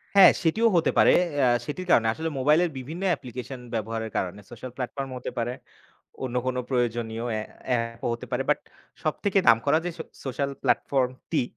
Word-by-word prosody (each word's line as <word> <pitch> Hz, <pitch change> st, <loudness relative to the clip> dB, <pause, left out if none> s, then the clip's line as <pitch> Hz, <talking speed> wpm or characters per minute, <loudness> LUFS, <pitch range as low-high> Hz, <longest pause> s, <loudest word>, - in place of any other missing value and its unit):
হ্যাঁ, 195 Hz, -2 st, +10 dB
সেটিও 215 Hz, +8 st, +3 dB
হতে 165 Hz, -, +3 dB
পারে। -, -, +7 dB, 0.3 s
আ -, -, +5 dB, 0.2 s
সেটির 185 Hz, +5 st, -4 dB
কারণে, 115 Hz, -, +5 dB
আসলে 160 Hz, +6 st, -3 dB
মোবাইলের 155 Hz, +6 st, +4 dB
বিভিন্ন 155 Hz, +8 st, -6 dB
অ্যাপ্লিকেশন 130 Hz, -4 st, -4 dB
ব্যবহারের 110 Hz, 0 st, -3 dB
কারণে 95 Hz, +2 st, -2 dB
সোশ্যাল 120 Hz, +2 st, -8 dB
প্ল্যাটফর্মও 130 Hz, 0 st, -4 dB
হতে -, -, -5 dB
পারে। 120 Hz, +1 st, -1 dB, 0.7 s
অন্য 125 Hz, -1 st, -3 dB
কোন 130 Hz, -, 0 dB
প্রয়োজনীয় 120 Hz, -3 st, -1 dB
অ্যা 110 Hz, -, -1 dB, 0.3 s
অ্যাপও 115 Hz, -2 st, -1 dB
হতে 115 Hz, -, -6 dB
পারে। -, -, 0 dB
বাট -, -, +3 dB, 0.4 s
সবথেকে 200 Hz, -1 st, +1 dB
নাম 115 Hz, -, +8 dB
করা 145 Hz, +2 st, +4 dB
যে -, -, 0 dB
সো -, -, -3 dB, 0.2 s
সোশ্যাল 140 Hz, +1 st, -1 dB
প্ল্যাটফর্মটি, 130 Hz, -2 st, +1 dB
130 Hz, 165 wpm, -26 LUFS, 115-150 Hz, 0.7 s, হ্যাঁ